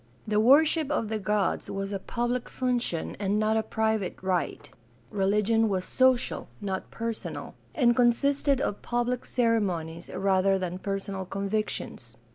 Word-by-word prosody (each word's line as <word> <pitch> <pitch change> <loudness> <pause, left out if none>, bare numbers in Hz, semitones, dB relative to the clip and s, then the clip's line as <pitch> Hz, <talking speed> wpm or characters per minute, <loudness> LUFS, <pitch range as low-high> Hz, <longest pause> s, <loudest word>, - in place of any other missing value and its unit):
The 210 0 +2
worship 295 +5 +5
of 230 -8 -1
the 220 -1 -1
gods 205 0 0
was 195 0 -3
a 195 - -2
public 240 +4 -2
function 245 -10 -1
and 200 0 0
not 215 +1 +2
a 220 - +3
private 220 -3 -1
right. 180 -5 -1 0.4
Religion 210 +3 +2
was 185 -2 -1
social, 260 -1 +2
not 190 -2 -4
personal, 230 -1 -5 0.2
and 240 -4 +4
consisted 275 +3 +3
of 205 -7 -2
public 240 +1 -1
ceremonies 185 -9 0
rather 195 0 +2
than 180 -1 -4
personal 195 -1 -3
convictions. 195 - -3
215 Hz, 135 wpm, -27 LUFS, 195-240 Hz, 0.4 s, worship